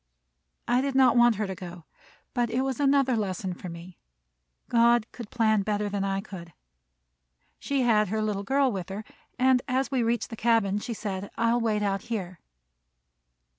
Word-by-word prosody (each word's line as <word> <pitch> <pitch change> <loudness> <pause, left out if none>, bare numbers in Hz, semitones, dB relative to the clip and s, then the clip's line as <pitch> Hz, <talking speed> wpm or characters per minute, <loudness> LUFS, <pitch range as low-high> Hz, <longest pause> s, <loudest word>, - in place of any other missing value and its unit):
I 245 +1 +3
did 275 -1 -2
not 260 -3 +5
want 240 -1 +5
her 210 +1 -2
to 190 - -4
go, 175 -2 -10 0.5
but 240 -2 0
it 240 +3 0
was 265 -2 -2
another 275 -2 +3
lesson 190 -3 -2
for 180 +1 -8
me. 170 +1 -11 0.7
God 235 -1 +4
could 235 -4 -9
plan 220 -3 +2
better 210 0 -1
than 200 -1 -2
I 195 0 -1
could. 170 -5 -10 1.1
She 275 -2 -1
had 215 -3 +3
her 215 +4 -2
little 210 -2 -1
girl 270 +5 +2
with 190 -3 -5
her, 200 +3 -5 0.3
and 255 0 +4
as 265 +1 0
we 260 -2 +1
reached 235 +1 -1
the - - -5
cabin, 220 -3 +2
she 230 +2 -5
said, 200 -2 -5
"I 230 0 +2
will 240 - +1
wait 215 -2 0
out 195 -1 0
here." 185 -7 -5
220 Hz, 180 wpm, -27 LUFS, 195-245 Hz, 1.1 s, not